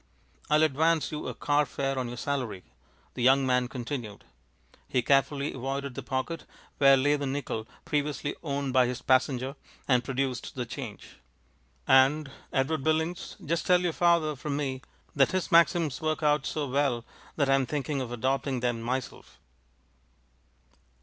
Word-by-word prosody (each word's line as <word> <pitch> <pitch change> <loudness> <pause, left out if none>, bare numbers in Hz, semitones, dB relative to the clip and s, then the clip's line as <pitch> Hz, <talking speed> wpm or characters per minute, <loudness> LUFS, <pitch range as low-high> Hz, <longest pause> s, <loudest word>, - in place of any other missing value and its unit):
"I'll 150 +1 +4
advance 155 +2 +2
you 150 - -4
a - - -5
car 145 0 +2
fare 135 -1 -2
on 125 - -2
your 120 +1 -7
salary," 125 -9 -3 0.5
the 125 - -5
young 135 +2 +5
man 125 -1 +2
continued. 120 -4 -6 0.6
He 125 - 0
carefully 140 +2 +2
avoided 135 +1 -4
the - - -5
pocket 140 +5 -3 0.3
where 135 -1 +7
lay 145 +3 +2
the 140 -1 -3
nickel 130 -5 -3 0.2
previously 145 0 -1
owned 140 -4 -2
by 130 -2 +5
his 125 0 -4
passenger, 130 +1 +1 0.3
and 125 -2 +3
produced 130 -1 -3
the 125 -2 -3
change. 115 - -8 0.7
"And, 135 +2 +4 0.2
Edward 135 +2 0
Billings, 160 +2 -1
just 165 +2 -1
tell 180 -1 +5
your 175 -2 0
father 170 -3 +2
from 140 +2 -3
me 135 -3 -3 0.3
that 135 +2 +3
his 185 -1 -1
maxims 165 -3 +4
work 155 0 -1
out 150 -1 +2
so 150 -2 -2
well 130 -3 0 0.3
that 140 -3 +1
I'm 135 -1 +3
thinking 145 0 -2
of 125 -2 -5
adopting 130 +1 -1
them 120 -2 -1
myself." 125 +2 -4
135 Hz, 155 wpm, -28 LUFS, 130-150 Hz, 0.7 s, where